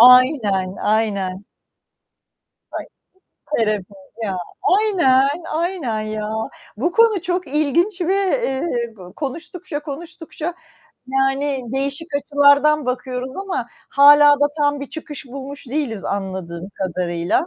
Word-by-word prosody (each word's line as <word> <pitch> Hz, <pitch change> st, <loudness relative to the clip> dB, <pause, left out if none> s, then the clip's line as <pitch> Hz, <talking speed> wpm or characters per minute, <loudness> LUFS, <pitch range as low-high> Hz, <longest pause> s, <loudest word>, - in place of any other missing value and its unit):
Aynen, 235 Hz, -7 st, +6 dB
aynen. 200 Hz, -3 st, 0 dB, 1.3 s
Ay -, -, -5 dB, 0.7 s
Terapi 210 Hz, -3 st, 0 dB, 0.3 s
ya. 190 Hz, -3 st, -2 dB, 0.4 s
Aynen, 330 Hz, -7 st, +3 dB
aynen 320 Hz, -10 st, -1 dB
ya. 215 Hz, 0 st, -3 dB, 0.4 s
Bu 340 Hz, +10 st, 0 dB
konu 455 Hz, -5 st, +4 dB
çok 360 Hz, -2 st, -1 dB
ilginç 310 Hz, +7 st, +1 dB
ve, 355 Hz, +2 st, +2 dB
eee, 270 Hz, -, 0 dB
go 180 Hz, -2 st, -12 dB
konuştukça 320 Hz, +2 st, -5 dB
konuştukça, 325 Hz, +2 st, -6 dB, 0.5 s
yani 270 Hz, +1 st, 0 dB
değişik 280 Hz, +4 st, -2 dB
açılardan 285 Hz, +1 st, +4 dB
bakıyoruz 255 Hz, 0 st, -3 dB
ama 390 Hz, 0 st, -3 dB, 0.2 s
hâlâ 290 Hz, +1 st, +8 dB
da 290 Hz, -, +6 dB
tam 290 Hz, -1 st, +2 dB
bir 280 Hz, -, -7 dB
çıkış 295 Hz, -3 st, -7 dB
bulmuş 275 Hz, +2 st, -8 dB
değiliz 250 Hz, -7 st, -2 dB
anladığım 190 Hz, -3 st, -4 dB
kadarıyla. 175 Hz, -, -1 dB
275 Hz, 105 wpm, -20 LUFS, 220-315 Hz, 1.3 s, hâlâ